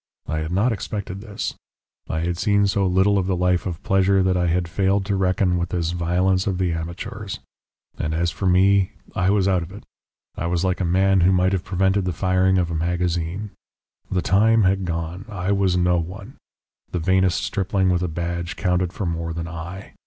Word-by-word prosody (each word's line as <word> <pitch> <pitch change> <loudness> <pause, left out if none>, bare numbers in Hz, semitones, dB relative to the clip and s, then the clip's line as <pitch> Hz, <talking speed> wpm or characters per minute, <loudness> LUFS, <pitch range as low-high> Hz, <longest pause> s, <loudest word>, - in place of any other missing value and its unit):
I 80 +2 -2
had 80 +1 -4
not 105 +7 +2
expected 100 -2 -4
this. 105 -2 -4 0.6
I 80 - -1
had 85 +1 -1
seen 100 +1 +3
so 100 0 +1
little 95 +2 +3
of 95 - -2
the 95 - +1
life 90 +1 +1
of 85 -3 -5
pleasure 95 0 +3
that 95 0 +2
I 90 -1 +1
had 85 +1 0
failed 95 +3 +1
to 100 0 0
reckon 95 -1 +1
with 85 - -2
this 85 -2 -1
violence 90 +2 +1
of 95 -3 0
the 90 -2 0
amateurs. 85 +5 -5 0.6
And 75 - -1
as 85 +1 0
for 95 - -3
me, 95 +2 +4 0.2
I 90 0 +1
was 100 -1 +2
out 95 -2 +2
of 85 +2 -7
it. 100 - -10 0.5
I 85 - -3
was 85 0 0
like 95 +1 0
a - - +1
man 95 +2 +3
who 90 +2 +5
might 95 0 +2
have 95 - -1
prevented 95 0 +1
the 90 - -1
firing 95 +2 +2
of 85 -2 0
a - - -2
magazine. 85 +3 -2 0.6
The 90 -2 -1
time 110 +3 +4
had 95 0 +2
gone. 85 +3 -4
I 95 -2 -2
was 95 -2 +2
no 90 0 +3
one; 90 +4 -7 0.5
the - - -3
vainest 95 +1 +2
stripling 95 -1 0
with 90 -1 +1
a 90 - 0
badge 85 +1 -4
counted 90 -1 0
for 100 - -4
more 85 -1 -2
than 85 0 -4
I. 85 +3 -8
90 Hz, 205 wpm, -22 LUFS, 85-95 Hz, 0.6 s, who